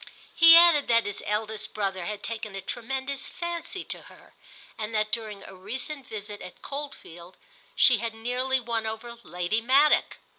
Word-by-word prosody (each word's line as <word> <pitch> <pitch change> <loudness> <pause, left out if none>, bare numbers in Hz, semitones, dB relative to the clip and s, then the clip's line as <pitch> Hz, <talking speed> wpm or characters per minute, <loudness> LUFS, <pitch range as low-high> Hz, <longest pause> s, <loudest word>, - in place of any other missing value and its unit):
He 335 0 +9
added 335 -4 +6
that 230 -1 +3
his 205 -1 -4
eldest 215 +1 -3
brother 195 -4 -2
had 210 +1 -5
taken 220 -3 -5
a 195 - -5
tremendous 265 +6 -4
fancy 345 +1 -5
to - - -5
her - - -19 0.4
and 220 0 -5
that 215 0 0
during 215 -3 -3
a - - -12
recent 255 +9 -5
visit 205 -2 -7
at 180 - -12
Coldfield 190 - -7 0.4
she 245 -4 +6
had 230 0 -4
nearly 250 +3 0
won 230 -2 -2
over 220 +2 -6
Lady 180 +4 -2
Maddock. 275 +5 +3
225 Hz, 160 wpm, -26 LUFS, 210-265 Hz, 0.4 s, He